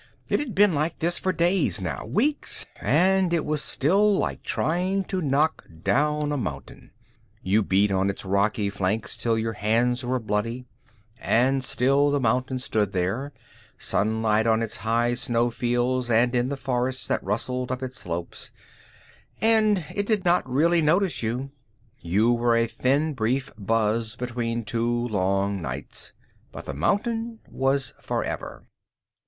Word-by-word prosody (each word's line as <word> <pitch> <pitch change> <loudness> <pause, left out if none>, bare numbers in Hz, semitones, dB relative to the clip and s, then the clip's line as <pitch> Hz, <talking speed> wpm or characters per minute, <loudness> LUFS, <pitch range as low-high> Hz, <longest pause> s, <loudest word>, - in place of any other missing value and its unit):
It - - +2
had 280 -8 -4
been 205 -2 +5
like 155 +2 -1
this 170 +1 0
for 190 - 0
days 175 - +2
now, 95 +2 -4
weeks, 260 - +1
and 190 -1 +2
it 170 -3 +1
was 150 0 -2
like 200 +6 +2
trying 185 +4 0
to 190 -1 -3
knock 150 +2 +1 0.2
down 150 +1 +1
a 145 - -1
mountain. 70 - -6 0.5
You 100 +4 +2
beat 100 +1 +2
on 95 0 +1
its 100 - -5
rocky 100 +1 +1
flanks 100 +2 -2
till 115 -1 0
your 115 0 -1
hands 120 +4 +1
were 125 +1 0
bloody, 115 +2 -2 0.5
and 130 +3 +2
still 140 +3 +2
the 145 0 +1
mountain 130 +2 0
stood 110 -5 -1
there, 95 +10 -1 0.5
sunlight 110 +1 +1
on 110 0 +3
its 115 - -4
high 120 +2 +1
snow 120 0 0
fields 120 +1 0
and 120 +2 +3
in 125 +1 +1
the 140 - -3
forests 130 -1 -2
that - - -1
rustled 125 +5 -2
up 130 +1 -3
its 130 0 -5
slopes, 85 -3 -5 0.9
and 215 -5 +3
it 200 0 -2
did 210 -4 0
not 175 -6 +2
really 165 +6 +3
notice 170 +4 +2
you. 125 +4 -3 0.5
You 105 +8 +2
were 120 0 +2
a 115 0 +3 0.5
brief 125 +3 0
thin - - -20
buzz 110 +1 0
between 120 -1 -3
two 120 +3 -1
long 100 -1 0
nights, - - -6 0.4
but - - -9
the 70 - -5
mountain 225 - -1
was 135 +1 0
forever. - - -4
125 Hz, 150 wpm, -25 LUFS, 110-150 Hz, 0.9 s, been